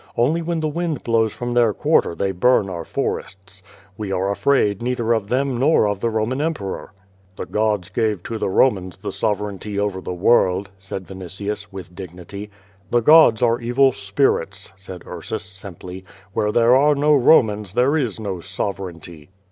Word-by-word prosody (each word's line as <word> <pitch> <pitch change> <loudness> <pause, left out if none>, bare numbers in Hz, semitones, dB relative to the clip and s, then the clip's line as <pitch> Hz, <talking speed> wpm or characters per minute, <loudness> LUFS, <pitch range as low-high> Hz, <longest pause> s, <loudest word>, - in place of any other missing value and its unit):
Only 150 +8 +2
when 165 0 -2
the 155 - 0
wind 160 -2 -3
blows 115 -2 +2
from 120 +3 -5
their 120 -4 +3
quarter 85 - +2
they 95 +2 -1
burn 100 +1 +2
our 85 -2 -5
forests. 95 +3 -5 0.4
We 105 -3 -4
are 95 +1 0
afraid 105 -3 +1
neither 120 -1 0
of 110 -3 -1
them 130 +1 0
nor 140 -5 +4
of 105 -2 -2
the 115 - 0
Roman 115 +5 -1
emperor." 150 -13 -4 0.4
"The - - -5
gods 105 -4 -1
gave 105 -3 -1
to 115 -1 -5
the - - -1
Romans 95 -4 +1
the 95 - -5
sovereignty 105 -1 -3
over 100 -2 -2
the - - -5
world," 95 0 +2
said 95 0 -7
Yinitius, 100 +3 -6
with 95 -2 -9
dignity. 95 +3 -9 0.4
"The 120 - +2
gods 125 -4 +6
are 120 0 +2
evil 130 +3 +3
spirits," 100 -3 -1
said 95 -1 -10
Tarsus, - - -5
simply. 95 -1 -8 0.3
"Where 105 0 0
there 120 +2 +4
are 145 +2 +4
no 150 +2 +3
Romans 110 - +3
there 130 +5 +3
is 125 -9 -1
no 100 -4 -4
sovereignty." 85 -4 -6
105 Hz, 170 wpm, -21 LUFS, 95-120 Hz, 0.4 s, gods